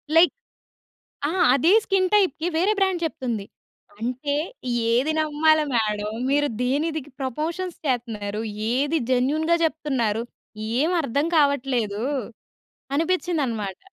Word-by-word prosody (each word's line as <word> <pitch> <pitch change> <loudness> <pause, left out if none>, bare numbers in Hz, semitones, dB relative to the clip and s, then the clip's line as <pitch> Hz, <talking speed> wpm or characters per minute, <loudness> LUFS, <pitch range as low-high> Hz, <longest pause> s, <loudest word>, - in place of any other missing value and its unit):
Like, 340 +2 +7 1.0
అహా! 350 +4 +1
అది 280 +6 +3
skin 380 -2 +2
టైప్‌కి 350 -6 +2
వేరే 370 +6 +3
బ్రాండ్ 380 -3 +1
చెప్తుంది. 240 -9 -3 0.5
అంటే 255 +5 -2 0.6
ఏది 255 +7 +2
నమ్మాల 310 0 +3
మేడమ్. 215 -1 -1
మీరు 290 +1 +2
దేనిదికి 295 +3 -1
ప్రపొషన్స్ 320 +7 -3
చేస్తున్నారు, 220 -5 -2 0.3
ఏది 285 +5 +1
జెన్యూన్‌గా 305 +7 +2
జెప్తున్నారు 260 -8 0 0.6
ఏమి 330 +6 +2
అర్థం 280 +4 0
కావట్లేదు! 250 -7 +1 0.9
అనిపించిందన్నమాట. 290 - -1
285 Hz, 100 wpm, -24 LUFS, 240-325 Hz, 1.0 s, Like